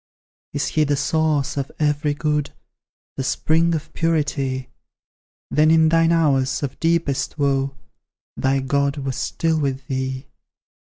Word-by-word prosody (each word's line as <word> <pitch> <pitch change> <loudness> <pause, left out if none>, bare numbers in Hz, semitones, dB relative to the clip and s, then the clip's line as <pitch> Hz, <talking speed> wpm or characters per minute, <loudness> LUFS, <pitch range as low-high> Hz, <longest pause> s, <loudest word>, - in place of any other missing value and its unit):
Is 145 - -1
He 155 - +2
the 145 -1 +1
source 150 -1 0
of 140 -1 -3
every 150 -1 +1
good, 150 -1 -1 0.7
The 135 - -1
spring 165 +5 +2
of 155 0 -6
purity? 145 -5 -1 0.8
Then 155 +1 +4
in 160 0 +5
thine 165 0 +4
hours 140 -5 +2
of 135 - -4
deepest 165 -4 0
woe, 135 -1 0 0.6
Thy 135 0 +1
God 140 +2 0
was 135 -2 -3
still 160 -1 0
with 135 -2 -2
thee. 130 0 -3
145 Hz, 130 wpm, -22 LUFS, 135-155 Hz, 0.8 s, in